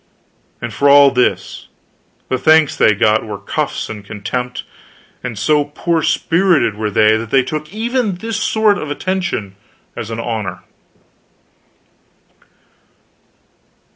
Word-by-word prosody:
And 120 -2 -4
for 140 +5 +2
all 140 -1 +7
this, 125 -1 -1 0.6
the 130 - -1
thanks 155 0 +4
they 105 - +4
got 105 +2 +2
were 105 -2 -6
cuffs 100 - -3
and 105 -2 -8
contempt; 125 +5 -5 0.6
and 120 -4 -5
so 150 +7 +2
poor 160 +3 -1
spirited 165 - +2
were 105 0 -2
they 110 +1 +4
that 115 0 -6
they 130 +2 +3
took 155 +3 -5
even 230 -1 -1
this 225 +4 -4
sort 215 -1 +2
of 155 - -5
attention 175 - -3 0.4
as 115 -2 -6
an 115 0 -5
honor. 110 -7 -4
130 Hz, 125 wpm, -17 LUFS, 110-165 Hz, 0.6 s, all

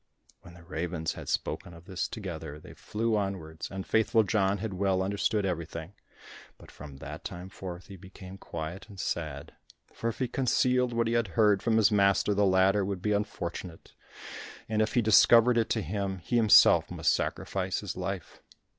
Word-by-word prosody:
When 85 - -14
the 85 - -15
ravens 85 -1 -3
had - - -8
spoken 85 - -3
of 85 +1 -15
this 95 -2 -3
together, 85 -8 -7
they - - -13
flew 110 +1 -2
onwards, 95 -6 -4
and 95 0 -6
Faithful 110 +1 +3
John 100 0 +1
had 105 0 -4
well 95 0 +1
understood 100 +1 0
everything, 85 -1 -4 0.6
but - - -15
from 70 -2 -11
that - - -8
time 90 +2 -7
forth 90 -2 -8
he 100 - -11
became 95 +1 -12
quiet 85 +6 -7
and 100 -2 -12
sad, 75 -4 -4 0.4
for 115 - -4
if 115 - -6
he 130 - -1
concealed 125 0 +1
what 115 0 0
he 115 - -1
had 115 -2 +1
heard 105 -3 +4
from 115 -2 +2
his 110 0 +4
master, 100 0 +3
the 100 0 +3
latter 95 +2 +3
would 95 -1 -4
be 105 - 0
unfortunate, 90 -4 -4 0.7
and 110 -1 0
if 110 +5 -1
he 120 - +3
discovered 115 +3 +6
it 115 - 0
to 110 - 0
him, 95 +2 -3
he 95 +7 -4
himself 110 -3 +6
must - - +1
sacrifice - - -2
his - - -5
life. - - -5
100 Hz, 180 wpm, -29 LUFS, 90-110 Hz, 0.7 s, discovered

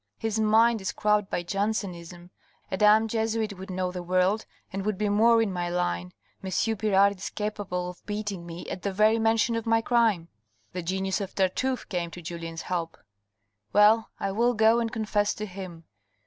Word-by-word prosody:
His 220 -1 -2
mind 220 +1 +4
is 190 - -2
crabbed 210 -1 +1
by 175 - -2
Jansen 200 +1 -1
ism.... 175 +1 -12 0.4
A 190 - -1
damned 215 +2 +5
Jesuit 220 -2 -1
would 190 - -8
know 185 0 -2
the 180 0 -5
world, 185 +4 +1 0.3
and 195 0 -3
would 210 -1 -1
be 210 +1 0
more 225 +2 +5
in 200 -4 -2
my 175 -1 -2
line. 90 - -2 0.3
M. 190 - -4 0.3
Pirard 200 -1 +3
is - - -4
capable 205 -4 -3
of 180 - -19
beating 205 -3 -4
me 170 0 -8
at 185 - -5
the 200 - -2
very 215 +3 +3
mention 225 +1 +2
of 230 0 -3
my 225 0 +4
crime." 225 -8 +2 0.5
The 180 - -3
genius 190 +3 -1
of 195 - -6
Tartuffe 245 +7 0
came 175 -3 -2
to 175 - -10
Julien's 165 -1 -6
help. 170 -2 -3 0.4
" 105 +1 -49
Well, 215 +2 +5
I 195 - -1
will 235 +4 +2
go 220 +2 +4
and 230 -1 -1
confess 210 -2 0
to 215 - -4
him." 180 -4 -9
200 Hz, 190 wpm, -27 LUFS, 180-220 Hz, 0.5 s, damned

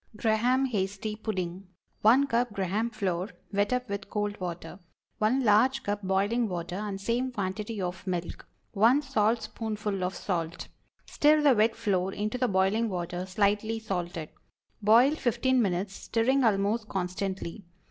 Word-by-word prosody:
GRAHAM 235 +5 +2
HASTY 205 +1 -2
PUDDING. 185 -5 -3
✠ - - -16 0.4
1 245 +6 +6
cup 240 -3 0
Graham 200 +4 -1
flour, 195 -4 -2 0.2
wet 205 +2 +1
up 250 0 0
with 200 -1 -5
cold 205 -1 -2
water. 175 0 -6 0.4
1 245 +5 +2
large 250 +5 +4
cup 205 0 -2
boiling 205 +5 +1
water 175 -1 -4
and 205 -1 -4
same 240 +5 -1
quantity 210 0 -3
of 180 +1 -4
milk. 175 -2 -4 0.2
1 235 +8 +4
saltspoonful 215 -4 -1
of 180 +1 -2
salt. 170 -3 -3 0.4
Stir 300 +1 +3
the 285 -3 +6
wet 225 0 +3
flour 195 -4 0
into 215 +4 -3
the 250 - +2
boiling 200 +4 +2
water, 180 0 -4
slightly 205 +3 +1
salted. 175 -7 -4 0.5
Boil 230 +6 +6
fifteen 260 -2 +1
minutes, 190 -1 -1
stirring 255 +4 +1
almost 215 +1 +1
constantly. 190 +1 -3
210 Hz, 145 wpm, -28 LUFS, 190-230 Hz, 0.5 s, 1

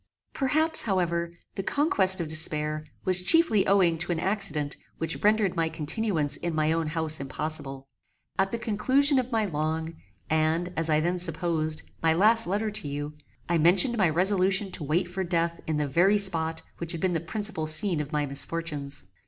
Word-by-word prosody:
Perhaps, 310 +4 +1
however, 170 -5 -1 0.2
the 195 - -4
conquest 190 - +5
of 170 - -3
despair 155 -1 +1 0.2
was 185 -1 +4
chiefly 225 - +3
owing 180 -4 +2
to 175 +2 -2
an 165 - -2
accident 165 -6 -2 0.2
which 165 +1 -4
rendered 210 -3 +2
my 165 -1 -1
continuance 160 -1 -2
in 170 -2 -4
my 155 0 0
own 165 -1 -1
house 155 0 -1
impossible. 135 -1 -6 0.5
At 195 0 +1
the 235 - -2
conclusion 260 +5 +2
of 255 0 -4
my 220 -2 0
long, 160 -1 -3 0.3
and, 160 +3 -1
as 165 0 -2
I 155 0 +2
then 175 +2 -2
supposed, 160 -2 0 0.2
my 160 -1 +2
last 225 +5 +4
letter 210 +4 -2
to 205 -8 +1
you, 145 +1 -5 0.3
I 170 -1 0
mentioned 180 +9 +4
my 190 -7 +2
resolution 190 +3 +2
to 165 - -6
wait 165 +5 -1
for 185 +2 -4
death 170 -1 -2
in 155 -1 -1
the 150 -1 -1
very 175 +9 +2
spot 165 -5 +1 0.2
which 170 0 -2
had 165 - -6
been 185 -1 0
the 165 - -1
principal 170 -1 -3
scene 155 +1 +5
of 145 0 -8
my 150 -2 -1
misfortunes. 145 - -4
170 Hz, 180 wpm, -26 LUFS, 155-195 Hz, 0.5 s, conquest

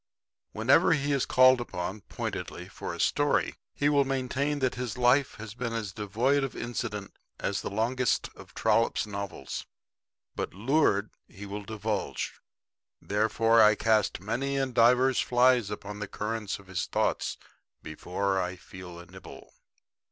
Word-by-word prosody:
Whenever - - +4
he 145 -2 0
is 140 -2 +1
called 130 -1 +6
upon, 95 -2 -5
pointedly, - - -5
for - - -6
a - - -7
story, - - +2 0.2
he 145 - 0
will 145 -1 +4
maintain 135 +2 -1
that 130 -3 0
his 125 -3 -4
life 125 +3 +3
has 110 -1 -8
been 120 -1 -4
as 110 -4 -3
devoid 120 +7 +1
of 135 - -4
incident 115 -4 -4 0.3
as - - -1
the - - -4
longest 120 +4 0
of - - -13
Trollope's 115 -1 +2
novels. 100 -9 -6 0.7
But - - -4
lured, 110 -2 +2 0.2
he 100 +2 -10
will 100 +1 -6
divulge. 105 -1 -3 0.6
Therefore 115 +2 +3
I 105 0 +7
cast 110 -1 +2
many 125 +8 -2
and 135 -2 -1
divers 125 +3 +4
flies 125 -3 +3
upon 105 0 -6
the 105 - -4
current 105 0 -3
of 100 - -16
his 90 -1 -3
thoughts - - -1 0.5
before 95 +5 -2
I 90 0 -3
feel 90 -1 -11
a 85 - -10
nibble. - - -13
115 Hz, 150 wpm, -28 LUFS, 100-130 Hz, 0.7 s, I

